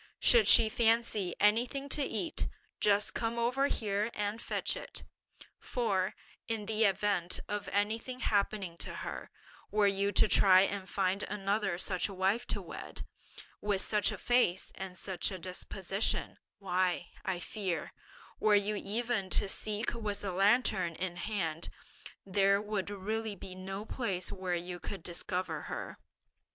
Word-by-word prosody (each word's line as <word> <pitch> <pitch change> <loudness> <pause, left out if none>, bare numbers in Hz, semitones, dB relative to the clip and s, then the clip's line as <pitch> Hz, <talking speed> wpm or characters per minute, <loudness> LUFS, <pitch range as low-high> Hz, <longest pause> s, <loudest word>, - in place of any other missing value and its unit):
Should 470 -3 +6
she 230 -2 +8
fancy 225 -5 +2
anything 240 +7 +2
to 295 - +1
eat, 280 +4 -1 0.3
just 205 0 +3
come 230 0 -1
over 250 +4 +2
here 210 -3 0
and 210 +2 -2
fetch - - 0
it; - - -8 0.6
for, 195 -7 0 0.3
in 225 -3 -2
the 220 +1 +2
event 195 -3 +1
of 205 0 -3
anything 225 +5 -1
happening 200 -4 0
to - - -5
her, - - -5 0.4
were 210 -1 +3
you 200 0 +2
to 215 - +5
try 190 -2 +7
and 195 0 -1
find 195 +1 +1
another 200 -2 -1
such 185 +1 0
a 195 - -7
wife 195 +6 +1
to - - -2
wed, - - -7 0.6
with 205 -2 +2
such 210 -1 +2
a - - -5
face 240 -7 +2
and 190 -1 -6
such 190 -2 -2
a 190 - -5
disposition, 190 +2 -2 0.2
why, 185 -2 0
I 190 -2 -1
fear, 180 -1 -3 0.5
were 215 -1 +5
you 205 +1 +2
even 220 -1 -1
to 195 - +2
seek 215 +3 -1
with 210 -3 -3
a 195 - -1
lantern 195 -3 +3
in 180 0 -3
hand, 175 -5 -2 0.6
there 195 +1 +3
would 210 -2 -2
really 210 +2 -3
be 185 0 -9
no 195 +2 -6
place 195 -8 -2
where 185 -3 -2
you 175 +1 -5
could 190 -1 -6
discover 180 +1 -3
her. - - -5
200 Hz, 150 wpm, -32 LUFS, 185-220 Hz, 0.6 s, she